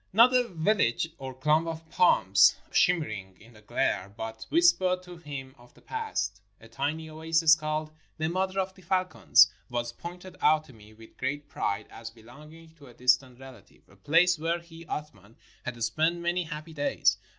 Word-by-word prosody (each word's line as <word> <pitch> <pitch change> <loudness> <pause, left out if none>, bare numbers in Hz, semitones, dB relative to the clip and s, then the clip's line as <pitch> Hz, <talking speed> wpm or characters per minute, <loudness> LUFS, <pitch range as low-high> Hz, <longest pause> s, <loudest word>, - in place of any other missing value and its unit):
Not 235 +6 +6
a 250 -1 +3
vil 190 +3 +1
lage, 120 +3 +1
or 135 -1 -6
clump 150 +5 +2
of 165 0 -6
palms 95 - +5 0.2
shimmering 110 - 0
in 115 +3 -17
the 105 - -17
glare, 100 -2 -1
but 110 0 -7
whispered 185 - +3
to 180 -1 -11
him 140 -5 -8
of 120 0 -20
the - - -20
past. 100 +1 -3 0.2
A 115 - -15
tiny 145 +7 -3
oasis, 160 +1 +3
called 155 -1 -2
" - - -39
The 160 0 -1
Mother 185 +3 -1
of 190 0 -2
the 190 - -18
Falcons," 185 - +4 0.2
was 120 -1 -3
pointed 180 +1 -10
out 155 0 +4
to 135 - -16
me 110 -1 -17
with 110 0 -17
great 145 +3 -3
pride, 100 +2 -2
as 115 0 -8
belonging 150 +9 -15
to 145 -2 -15
a 120 - -16
distant 125 0 +2
relative; 125 -7 -15
a 95 - -21
place 165 - +3
where 165 +2 0
he, 165 -1 -13
Athman, 115 -10 -7 0.3
had 120 -2 -5
spent 160 +9 +1
many 175 +1 -1
happy 155 0 -8
days. 145 -1 +1
155 Hz, 185 wpm, -28 LUFS, 120-170 Hz, 0.3 s, Not